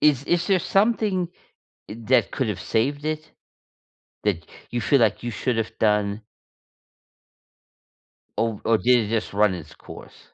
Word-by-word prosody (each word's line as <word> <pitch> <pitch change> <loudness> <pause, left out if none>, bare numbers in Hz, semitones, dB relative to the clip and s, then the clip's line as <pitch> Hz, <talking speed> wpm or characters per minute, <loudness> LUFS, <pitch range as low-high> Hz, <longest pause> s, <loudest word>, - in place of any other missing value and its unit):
is 140 -3 +3
is 175 0 +1
there 190 -2 +3
something 200 -4 +1 0.6
that 115 +4 +1
could 130 -4 -1
have 105 - -3
saved 140 +6 0
it? 155 0 -3 0.9
That 90 -6 0 0.2
you 120 - -2
feel 140 +5 +3
like 105 -2 +2
you 120 - -3
should 115 +4 -1
have 115 0 -2
done 105 0 +1 2.2
oh 110 -1 0
or 115 -1 +4
did 120 -2 +3
it - - -6
just 110 0 -1
run 105 -1 +3
its 80 -3 -8
course? - - -14
115 Hz, 145 wpm, -24 LUFS, 105-145 Hz, 2.2 s, or